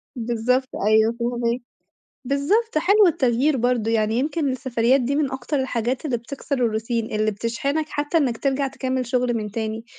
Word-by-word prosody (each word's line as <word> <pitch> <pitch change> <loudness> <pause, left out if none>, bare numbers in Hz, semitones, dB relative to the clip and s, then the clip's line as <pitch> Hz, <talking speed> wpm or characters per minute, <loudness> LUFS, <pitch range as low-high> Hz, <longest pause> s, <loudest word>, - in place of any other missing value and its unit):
بالضبط، 245 +2 0 0.2
أيوه 220 +2 +4
فاهماك 240 0 -1 0.6
بالضبط، 310 - +1
حلو 400 +4 +5
التغيير 265 -1 +2
برضه 235 -2 +1
يعني، 220 0 +1
يمكن 300 0 0
السفريات 255 0 +1
دي 275 +4 -1
من 290 -3 0
أكتر 265 +2 -2
الحاجات 250 +1 -2
اللي 250 -5 0
بتكسر 275 +4 -5 0.2
الroutine 225 0 -2
اللي 215 0 +1
بتشحنك 275 +9 -2
حتى 290 +3 -1
إنّك 250 -7 +1
ترجع 275 0 0
تكمّل 260 -1 -2
شُغل 245 0 0
من 210 -3 -3
تاني. 220 +1 -4
250 Hz, 155 wpm, -23 LUFS, 230-280 Hz, 0.6 s, حلو